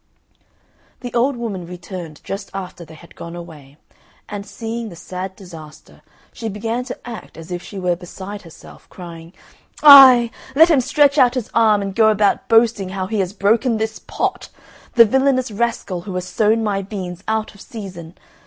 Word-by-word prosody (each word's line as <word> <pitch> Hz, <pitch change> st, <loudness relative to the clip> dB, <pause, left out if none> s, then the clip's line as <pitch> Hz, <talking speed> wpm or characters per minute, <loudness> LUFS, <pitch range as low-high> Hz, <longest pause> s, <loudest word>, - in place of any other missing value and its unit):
The 245 Hz, -2 st, -7 dB
old 250 Hz, +3 st, +2 dB
woman 205 Hz, -7 st, -5 dB
returned 175 Hz, -3 st, -9 dB
just 195 Hz, 0 st, -6 dB
after 180 Hz, -2 st, -7 dB
they 160 Hz, -, -14 dB
had 170 Hz, +2 st, -17 dB
gone 170 Hz, 0 st, -8 dB
away, 155 Hz, -5 st, -12 dB, 0.5 s
and 205 Hz, 0 st, -7 dB
seeing 230 Hz, 0 st, -5 dB
the 175 Hz, -, -11 dB
sad 185 Hz, +2 st, -7 dB
disaster, 160 Hz, -6 st, -13 dB, 0.3 s
she 225 Hz, -, -5 dB
began 225 Hz, +4 st, -3 dB
to 255 Hz, -, -6 dB
act 230 Hz, -2 st, -9 dB
as 165 Hz, +2 st, -11 dB
if 175 Hz, 0 st, -4 dB
she 200 Hz, -, -10 dB
were 180 Hz, -2 st, 0 dB
beside 190 Hz, +3 st, -9 dB
herself, 165 Hz, -3 st, -15 dB
crying, 170 Hz, -2 st, -11 dB, 0.5 s
"Ay, 260 Hz, -5 st, +9 dB, 0.2 s
let 325 Hz, +4 st, +6 dB
him 285 Hz, -5 st, +4 dB
stretch 285 Hz, +3 st, +3 dB
out 250 Hz, -1 st, +4 dB
his 250 Hz, -2 st, -4 dB
arm 215 Hz, -3 st, +3 dB
and 195 Hz, -1 st, -4 dB
go 220 Hz, +1 st, +4 dB
about 210 Hz, -1 st, +1 dB
boasting 225 Hz, -4 st, +3 dB
how 190 Hz, 0 st, -3 dB
he 210 Hz, +2 st, -2 dB
has 185 Hz, -2 st, -1 dB
broken 225 Hz, +4 st, +1 dB
this 220 Hz, 0 st, -3 dB
pot! -, -, -3 dB, 0.5 s
The 230 Hz, -2 st, +8 dB
villainous 260 Hz, +1 st, +1 dB
rascal 210 Hz, -4 st, -2 dB
who 185 Hz, 0 st, -7 dB
has 180 Hz, 0 st, -3 dB
sown 215 Hz, +5 st, +1 dB
my 200 Hz, -2 st, -1 dB
beans 190 Hz, -2 st, -7 dB
out 220 Hz, 0 st, -1 dB
of 200 Hz, -, -16 dB
season. 185 Hz, -6 st, -9 dB
205 Hz, 175 wpm, -19 LUFS, 180-230 Hz, 0.5 s, Ay